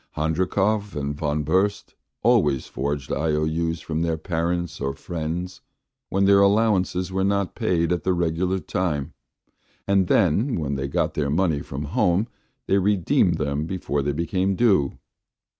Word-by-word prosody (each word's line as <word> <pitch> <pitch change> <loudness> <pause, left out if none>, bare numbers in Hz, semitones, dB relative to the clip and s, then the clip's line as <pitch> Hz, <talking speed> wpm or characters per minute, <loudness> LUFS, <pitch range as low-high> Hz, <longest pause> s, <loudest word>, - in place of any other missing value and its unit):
Handrikov 95 +6 0
and 70 0 -2
Von 75 0 -1
Burst 95 +7 0 0.3
always 100 - +3
forged 70 0 -3
IOU's 80 +1 0
from 80 0 -3
their 85 -1 0
parents 85 +1 -2
or 70 0 -2
friends 85 +2 -5 0.5
when 95 +1 +2
their 100 0 +6
allowances 100 -3 +2
were 95 0 0
not 100 -1 0
paid 85 -1 0
at 90 - -3
the 95 - +1
regular 85 +2 0
time, 80 -5 -2 0.7
and 100 -2 +3
then 110 - +2
when 70 -3 -2
they 70 0 -2
got 70 - -1
their 70 -2 -1
money 80 -1 +1
from 70 +2 -6
home 90 +7 +1 0.4
they 100 - +2
redeemed 95 -2 +2
them 75 +1 -2
before 80 -6 -2
they 70 +1 -1
became 90 +5 0
due. 95 - +2
85 Hz, 145 wpm, -24 LUFS, 75-95 Hz, 0.7 s, their